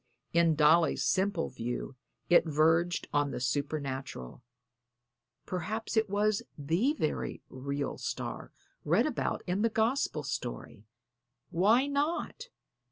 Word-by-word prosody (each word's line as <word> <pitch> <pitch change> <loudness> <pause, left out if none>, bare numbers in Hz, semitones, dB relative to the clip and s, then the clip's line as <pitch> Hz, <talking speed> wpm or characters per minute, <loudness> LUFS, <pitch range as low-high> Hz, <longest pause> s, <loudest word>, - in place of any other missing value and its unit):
In 170 -1 +4
Dolly's 160 +2 +4
simple 190 -2 +1
view 125 +1 -4 0.3
it 175 -1 +5
verged 160 +3 +2
on 145 -1 +2
the - - -4
supernatural 135 - -3 1.0
perhaps 210 +6 -3
it 220 -2 +2
was 205 +1 +1 0.2
the 170 - +1
very 155 - -2
real 140 +2 -4
star - - -5 0.3
read - - +3
about - - -2
in 180 +3 -1
the 230 - +3
Gospel 220 - 0
story. 120 -6 -5 0.6
Why 210 +9 +4
not? 305 +11 -2
165 Hz, 110 wpm, -30 LUFS, 140-210 Hz, 1.0 s, it